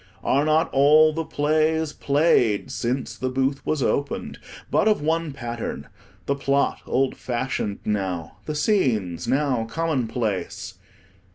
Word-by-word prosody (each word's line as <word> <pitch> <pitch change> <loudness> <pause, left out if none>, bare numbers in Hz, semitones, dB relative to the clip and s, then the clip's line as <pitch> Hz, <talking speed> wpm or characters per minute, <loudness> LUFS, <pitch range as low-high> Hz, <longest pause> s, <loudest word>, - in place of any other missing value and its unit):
Are 140 +2 +2
not 155 +1 +2
all 155 +3 +6
the 165 +1 -2
plays, 155 +1 +1
played 140 -8 +2
since 125 +2 -2
the 130 - -2
booth 135 +2 -1
was 150 -4 0
opened, 140 +3 -2 0.3
but - - +3
of 215 - +3
one 160 0 0
pattern, 120 -4 -5 0.4
the 140 - +1
plot 140 0 0
old 135 0 +1
fashioned 120 -4 -3
now, 95 -6 -2
the 150 - -2
scenes 110 - +1
now 135 -5 +1
commonplace? 120 - -2
140 Hz, 125 wpm, -24 LUFS, 120-155 Hz, 0.4 s, all